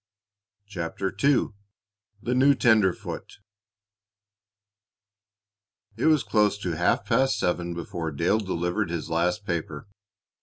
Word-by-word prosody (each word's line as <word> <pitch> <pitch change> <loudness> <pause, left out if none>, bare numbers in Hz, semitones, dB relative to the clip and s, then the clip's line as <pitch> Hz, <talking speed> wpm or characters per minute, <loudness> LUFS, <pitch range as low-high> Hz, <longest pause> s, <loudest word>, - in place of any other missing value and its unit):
CHAPTER 95 -1 -4
II 140 -1 +3 0.7
THE 120 - -1
NEW 135 +2 +5
TENDERFOOT 110 -8 +1 2.6
It 115 - 0
was 155 -5 +4
close 105 -2 +2
to 95 -4 -3
half 85 +4 +1
past 120 +1 +2
seven 90 -3 -1
before 85 -1 -4
Dale 85 +8 +1
delivered 95 0 -2
his 85 -1 -4
last 90 +5 0
paper. 80 -4 -4
95 Hz, 105 wpm, -26 LUFS, 85-110 Hz, 2.6 s, NEW